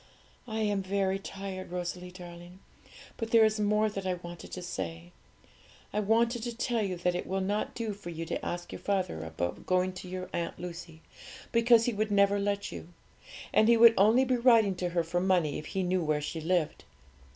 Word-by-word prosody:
I 220 -1 -3
am 205 -2 +1
very 195 0 0
tired, 195 -1 -7
Rosalie 180 0 -4
darling, 175 0 -11 0.6
but 225 -2 -4
there 225 -1 +6
is 215 0 +1
more 210 +1 +2
that 195 -2 -4
I 185 - 0
wanted 175 -1 -10
to 180 - -5
say. 85 - -5 0.8
I 210 - +1
wanted 230 +3 +2
to 235 0 -5
tell 240 -1 0
you 195 -3 -1
that 180 +1 0
it 175 - -4
will 190 +1 -1
not 205 +3 -2
do 225 -3 -3
for 195 -3 -9
you 165 0 -5
to 165 - -4
ask 175 0 -4
your - - -7
father 185 - -1
about 80 +2 -4
going 185 0 +2
to 180 0 -9
your 185 0 -5
Aunt 170 -1 -3
Lucy, 170 -2 -8 0.5
because 230 0 +5
he 245 - 0
would 215 +1 -1
never 200 0 +3
let 200 0 -1
you, - - -8 0.7
and 215 - +5
he 235 0 +6
would 230 0 +9
only 220 +7 +5
be 255 -1 +1
writing 230 -5 +5
to 180 0 -1
her 170 -1 0
for 175 +2 -1
money 180 -6 +1
if 155 - -9
he 190 - -2
knew 180 0 +1
where 155 -1 +1
she 155 +2 -4
lived. 170 -1 0
190 Hz, 205 wpm, -30 LUFS, 175-215 Hz, 0.8 s, would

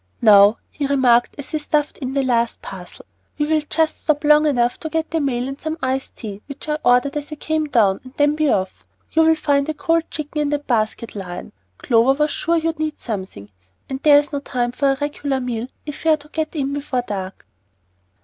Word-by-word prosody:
"Now," 205 -1 +7
he 285 -2 -2
remarked 250 -4 +3
as 285 - -8
he 310 - -1
stuffed 295 0 -1
in 265 -1 -4
the 275 - +2
last 235 -2 0
parcel, 180 -2 -10 0.3
"we 295 - +1
will 310 0 +2
just 320 0 0
stop 305 -1 0
long 300 +1 +5
enough 245 -4 +1
to 315 - -5
get 320 +1 -2
the 325 - +1
mail 255 -4 -1
and 275 +1 -7
some 315 +1 -3
iced 265 -1 -2
tea, 205 -2 -8
which 280 +1 -8
I 300 0 -1
ordered 250 +4 +3
as 295 +1 -6
I - - -4
came 310 +1 -1
down, 210 -8 +3
and 255 - -12
then 290 0 +3
be 305 -1 +1
off. 190 -4 -1 0.3
You'll 320 0 +4
find 285 -1 +1
a 310 - -2
cold 330 +2 0
chicken 300 0 -4
in 295 - 0
that 290 0 -2
basket, 225 -1 -1
Lion. 180 -3 -7 0.3
Clover 235 +2 +3
was 300 +2 0
sure 335 +1 0
you'd 325 -1 -1
need 310 -1 -2
something, 185 - -6 0.4
and 265 - -3
there's 290 -1 +5
no 285 - 0
time 245 -3 -2
for 275 +2 +1
a 270 - -1
regular 290 -2 -2
meal 245 -2 -3 0.2
if 295 -2 -7
we 325 - +2
are 310 - +5
to 300 0 -16
get 315 +1 -3
in 280 -2 -1
before 280 -3 -2
dark." 190 - -5
280 Hz, 215 wpm, -20 LUFS, 240-305 Hz, 0.4 s, Now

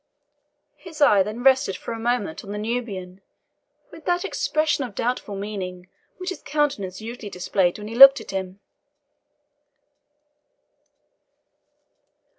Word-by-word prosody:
His 330 -4 -12
eye 210 -9 +5
then 215 +5 -4
rested 265 -6 +3
for - - -7
a 225 - -6
moment 230 -7 -2
on 200 - -8
the 210 - -4
Nubian, 210 -5 -4 0.7
with 325 -1 -13
that 355 +2 0
expression 310 -6 0
of 235 -6 -8
doubtful 235 -4 -2
meaning 185 -3 -6 0.3
which 365 0 -5
his 370 - -7
countenance 275 -11 -2
usually 225 -1 -7
displayed 180 -1 0
when 210 0 -8
he 225 - -7
looked 275 +3 +9
at - - -9
him. 190 0 -5
220 Hz, 125 wpm, -23 LUFS, 195-275 Hz, 0.7 s, looked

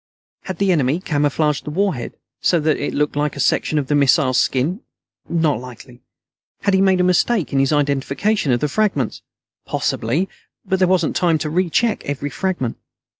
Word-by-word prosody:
Had 190 -3 -5
the 200 -1 +2
enemy 150 -1 +1
camouflaged 150 -2 0
the - - -6
warhead 180 -6 -1 0.3
so 175 - +3
that 155 0 +1
it 145 - -3
looked 150 0 0
like 150 0 -1
a - - -8
section 155 +2 +1
of 145 - 0
the 145 - -1
missile's 140 -2 +3
skin? 155 - 0 0.5
Not 160 -7 +1
likely. 125 0 -12 0.6
Had 200 - +1
he 190 - +4
made 190 -1 +3
a - - +3
mistake 180 0 +1
in 135 - +2
his 135 +1 +2
identification 145 +5 0
of 120 - +1
the 150 - +1
fragments? 145 - -1 0.5
Possibly, 180 +6 -1 0.4
but 190 - 0
there 185 - +4
wasn't 180 -3 +1
time 170 -3 +2
to 150 0 -4
recheck 185 +6 +1
every 145 0 -3
fragment. 175 -11 -2
150 Hz, 175 wpm, -20 LUFS, 140-185 Hz, 0.6 s, he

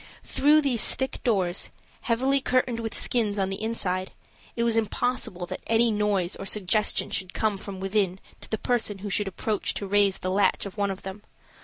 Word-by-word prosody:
Through 300 +2 +4
these 250 -6 +4
thick 265 -1 -3
doors, 190 -6 +1 0.3
heavily 260 +4 +1
curtained 250 -2 +1
with 225 -1 -4
skins 215 -4 0
on 195 -1 0
the 195 - -4
inside, 190 -5 -1 0.4
it 235 - 0
was 230 -1 +2
impossible 225 -4 -1
that - - -7
any 230 +1 +3
noise 205 -4 +1
or 195 - -7
suggestion 210 +1 +1
should 185 -2 -3
come 215 -2 +1
from 195 0 -7
within 195 -1 0 0.2
to - - -10
the 220 - -1
person 220 -3 0
who 205 - -3
should 205 +1 0
approach 205 +2 -2
to 200 - -3
raise 200 0 +3
the 185 - -3
latch 195 +1 +2
of 200 - -7
one 200 -1 0
of 190 -1 -5
them. 190 +2 -7
205 Hz, 190 wpm, -26 LUFS, 195-230 Hz, 0.4 s, Through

